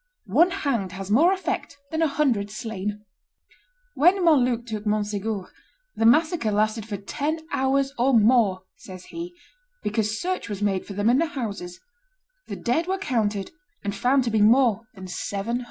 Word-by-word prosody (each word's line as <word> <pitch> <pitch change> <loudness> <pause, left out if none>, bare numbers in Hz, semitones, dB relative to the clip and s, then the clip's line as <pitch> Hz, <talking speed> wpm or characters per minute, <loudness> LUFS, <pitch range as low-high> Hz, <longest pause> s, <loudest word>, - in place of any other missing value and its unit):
One 345 +2 +6
hanged 270 - -2
has 195 +1 -6
more 315 - +5
effect 375 -6 -3
than 320 0 -1
a 325 - +4
hundred 265 -9 0
slain." 210 -1 -5 0.9
When 355 +4 +4
Montluc 250 -7 +3
took 215 -3 -5
Monsegur, 210 -1 -2 0.4
"the 225 - +3
massacre 310 -1 +3
lasted 215 +1 0
for 205 -2 -4
ten 285 +11 -3 0.2
hours 270 +1 +1
or 260 +3 +3
more," 220 -5 +4
says 185 -1 -11
he, 345 +1 -6 0.5
"because 215 0 -1
search 370 - -3
was 205 -2 -4
made 200 -2 -1
for 200 - -6
them 205 +2 0
in 245 +3 +4
the 330 - +2
houses; 205 - -5 0.7
the - - -5
dead 315 +8 0
were 380 +1 0
counted 215 - -1 0.3
and 200 -1 -2
found 255 +6 +2
to 235 - -2
be 215 -1 +2
more 230 0 +4
than 190 -1 -9
seven 200 +5 -3
hundred." - - -4
225 Hz, 170 wpm, -24 LUFS, 205-280 Hz, 0.9 s, One